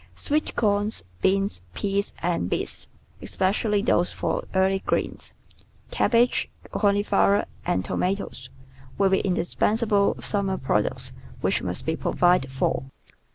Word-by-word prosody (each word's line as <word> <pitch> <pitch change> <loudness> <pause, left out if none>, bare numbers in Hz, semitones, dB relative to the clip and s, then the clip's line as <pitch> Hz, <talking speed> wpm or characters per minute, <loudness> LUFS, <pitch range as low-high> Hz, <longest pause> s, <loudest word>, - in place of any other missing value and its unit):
Sweet 300 +1 -1
corn, 205 -1 +2 0.3
beans, 195 +1 +1
peas, 200 0 -1
and 170 - 0
beets, - - -3 0.3
especially 205 +2 0
those 175 -6 +2
for - - -2
early 190 +1 +3
greens, - - -2 0.6
cabbage, 240 +1 +2 0.2
cauliflower, 205 0 +3 0.2
and 95 +1 +1
toma 185 +2 0
toes, 130 -10 -8 0.5
will 195 -1 +4
be 190 - +4
indispensable 200 +3 +1
summer 195 -2 -1
products 105 -6 -1 0.3
which - - +1
must - - -3
be - - 0
provided 175 -7 +2
for. 130 - 0
195 Hz, 115 wpm, -25 LUFS, 180-205 Hz, 0.6 s, will